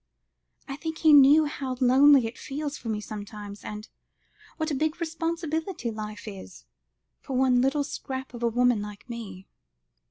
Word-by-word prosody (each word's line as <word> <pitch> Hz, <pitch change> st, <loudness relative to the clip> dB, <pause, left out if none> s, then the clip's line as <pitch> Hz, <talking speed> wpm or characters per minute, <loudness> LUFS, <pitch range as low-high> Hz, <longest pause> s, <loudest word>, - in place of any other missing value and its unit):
I 275 Hz, -, -6 dB
think 320 Hz, 0 st, -5 dB
he 315 Hz, -2 st, +5 dB
knew 290 Hz, +2 st, +7 dB
how 270 Hz, -3 st, -4 dB
lonely 265 Hz, +1 st, +6 dB
it 225 Hz, +2 st, -5 dB
feels 290 Hz, +1 st, -5 dB
for 235 Hz, -, -7 dB
me 215 Hz, -1 st, -1 dB
sometimes, 205 Hz, -1 st, -8 dB
and 210 Hz, +1 st, -7 dB, 0.7 s
what 315 Hz, -1 st, -2 dB
a -, -, 0 dB
big 310 Hz, +4 st, -1 dB
responsibility 330 Hz, -, -3 dB
life 215 Hz, -1 st, -7 dB
is, 95 Hz, -11 st, -10 dB, 0.5 s
for 265 Hz, -, -4 dB
one 255 Hz, -1 st, +4 dB
little 275 Hz, +3 st, +1 dB
scrap 265 Hz, -2 st, -6 dB
of 240 Hz, -, -8 dB
a 235 Hz, -, +2 dB
woman 245 Hz, -1 st, +2 dB
like 210 Hz, 0 st, -9 dB
me." 205 Hz, -6 st, -8 dB
255 Hz, 160 wpm, -26 LUFS, 215-295 Hz, 0.7 s, knew